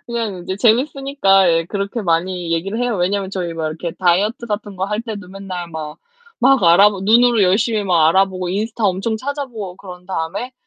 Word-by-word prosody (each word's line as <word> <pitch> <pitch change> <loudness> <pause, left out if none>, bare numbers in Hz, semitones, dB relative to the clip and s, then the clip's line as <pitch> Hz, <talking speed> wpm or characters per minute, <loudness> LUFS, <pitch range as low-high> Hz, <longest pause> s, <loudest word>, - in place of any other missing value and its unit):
그냥 225 -6 -4
이제 190 +1 -4
재밌으니까 240 - +3
예 165 0 +1
그렇게 200 +4 -3
많이 175 0 -1
얘기를 195 +7 -2
해요. 245 -4 0
왜냐면 190 +2 -1
저희 180 -3 -3
막 160 -1 -3
이렇게 160 +2 -4
다이어트 195 +6 0
같은 205 -2 -5
거 190 - -1
할 210 +2 -2
때도 205 -6 -7
맨날 185 -3 -7
막 155 -1 -7 0.4
막 265 -2 +4
알아보 195 +4 +5
눈으로 230 +2 +4
열심히 210 +4 +2
막 170 -5 +3
알아보고 185 0 +1
인스타 215 +3 -2
엄청 195 +4 0
찾아 280 +4 -4
보고 210 -7 -7
그런 180 -2 -11
다음에 190 +7 -4
195 Hz, 400 characters per minute, -18 LUFS, 180-220 Hz, 0.4 s, 알아보